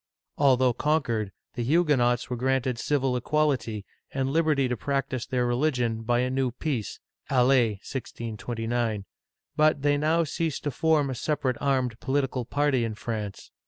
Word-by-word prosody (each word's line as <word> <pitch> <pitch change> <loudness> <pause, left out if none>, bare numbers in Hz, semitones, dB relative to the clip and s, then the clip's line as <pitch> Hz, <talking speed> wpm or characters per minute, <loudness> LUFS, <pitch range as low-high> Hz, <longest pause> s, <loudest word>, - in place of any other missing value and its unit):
Although 130 -3 +4
conquered, 120 -8 0 0.2
the 120 - -4
Huguenots 130 -4 +2
were 125 - -3
granted 130 0 0
civil 135 -2 +1
equality, 125 -6 0 0.3
and 135 0 -1
liberty 155 -4 +2
to 125 - -1
practice 135 0 -2
their 125 -2 0
religion, 120 -3 0
by 120 +2 +1
a 125 - 0
new 130 -1 +1
peace 125 -2 -3 0.3
(Alais, 125 -4 +4
1629); 115 -3 -3 0.5
but 155 -2 +3
they 145 0 +3
now 160 +3 +2
ceased 160 -1 -2
to 145 - -1
form 150 0 +2
a - - -2
sepa 150 +3 -2
rate 130 -2 +1
armed 130 -4 0
political 135 -2 -1
party 140 -1 +1
in 110 -2 -3
France. 105 -2 -5
130 Hz, 150 wpm, -27 LUFS, 120-145 Hz, 0.5 s, Although